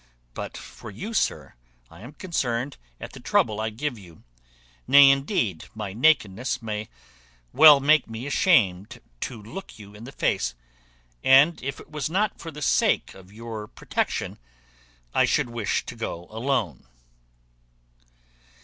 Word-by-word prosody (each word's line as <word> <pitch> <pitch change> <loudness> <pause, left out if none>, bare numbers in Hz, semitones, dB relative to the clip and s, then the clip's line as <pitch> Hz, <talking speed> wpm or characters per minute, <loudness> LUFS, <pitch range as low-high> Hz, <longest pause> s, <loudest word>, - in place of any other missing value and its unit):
But - - -6
for - - -11
you, 200 - -7
sir, 75 - -1 0.4
I - - -14
am 125 +7 -11
concerned 135 - -3 0.2
at - - -9
the - - -10
trouble 110 0 +1
I 110 - -1
give 120 +2 -4
you; 85 -5 -16 0.6
nay, 140 -1 +8
indeed, 135 - -1
my 105 -3 -5
nakedness 125 -2 +2
may 110 -2 -5 0.6
well 150 -3 +9
make 150 +1 +3
me 115 +3 -6
ashamed 120 - +2 0.2
to 115 - -5
look 115 - -10
you 100 -2 -13
in 105 +3 -11
the 135 - -9
face; - - -1 0.7
and 140 +5 +5
if 135 +1 -5
it - - -15
was 150 -1 -3
not 200 +5 0
for 165 - -7
the 150 -1 -7
sake - - +2
of 95 0 -16
your 110 -1 -7
protection, - - -3 0.7
I - - +4
should 120 - 0
wish 115 -4 -2
to - - -8
go 85 +1 -5
alone." 110 - -2
120 Hz, 145 wpm, -25 LUFS, 105-145 Hz, 0.7 s, well